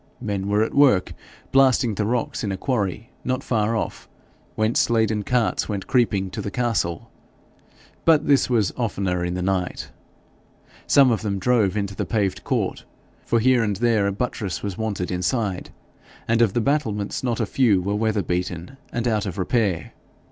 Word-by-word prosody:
Men 100 -1 -3
were 105 +1 +2
at - - -3
work 135 -10 +4 0.4
blasting 130 -4 +4
the 105 +1 -1
rocks 120 0 -1
in 100 - -1
a 95 - -3
quarry 105 -2 -2
not 130 +2 -2
far 110 -1 0
off, 110 - -4 0.5
whence 110 +2 +2
laden 110 -2 +1
carts 120 +1 0
went 100 -2 -3
creeping 100 -7 +1
to - - -4
the - - -4
castle; 105 -7 -2 0.9
but 155 -2 +4
this 140 -2 +3
was 110 -6 +1
oftener 95 -7 -1
in 90 0 -2
the 90 - -2
night. 95 -1 -2 1.0
Some 135 -3 +6
of 115 - 0
them 100 -3 -2
drove 105 -1 +2
into 100 -1 -2
the - - -3
paved 100 -5 -1
court, - - -1 0.4
for 115 - +2
here 125 +1 +4
and 105 -2 0
there 110 -1 +2
a - - 0
buttress 105 -2 -3
was 100 -3 -3
wanted 100 -5 -3
inside, 95 +1 -1 0.6
and 115 0 +2
of 110 -5 +3
the 120 - +1
battlements 110 -7 -1
not 120 -2 -1
a 115 - +1
few 110 -4 +3
were 100 +3 -2
weather 110 -1 0
beaten 90 +6 -3
and 120 0 -2
out 110 -3 0
of 95 0 -5
repair. 95 -4 0
105 Hz, 175 wpm, -23 LUFS, 95-120 Hz, 1.0 s, Some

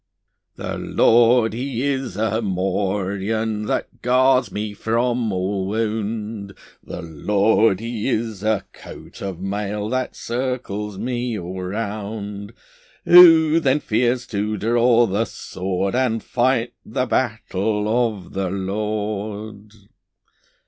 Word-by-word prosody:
The - - -5
Lord 115 -1 +4
He 125 +1 -3
is 135 -7 -2
a 110 +1 0
morion 100 +2 -1
That - - -3
guards 130 +1 +3
me 105 0 -4
from 115 +1 0
all 95 +1 -1
wound; 105 -1 -3 0.3
The 90 - -7
Lord 100 +5 +2
He 115 +1 -3
is 110 -5 -2
a 110 +1 0
coat - - -12
of 95 -3 -5
mail 105 +2 -3
That 130 +1 -2
circles 115 -5 -3
me 120 +1 -2
all 90 0 -6
round. 100 +1 -5 0.5
Who 165 -2 +8
then 145 -2 +2
fears 120 0 0
to 105 +1 -1
draw 120 +2 +3
the 105 +2 0
sword, 95 -1 -3
And 120 -3 0
fight 120 -1 +1
the 125 +3 -2
battle 105 -4 -1 0.2
of 95 -4 -11
the 95 -1 -1
Lord? 105 +1 -4
110 Hz, 115 wpm, -21 LUFS, 100-120 Hz, 0.5 s, Who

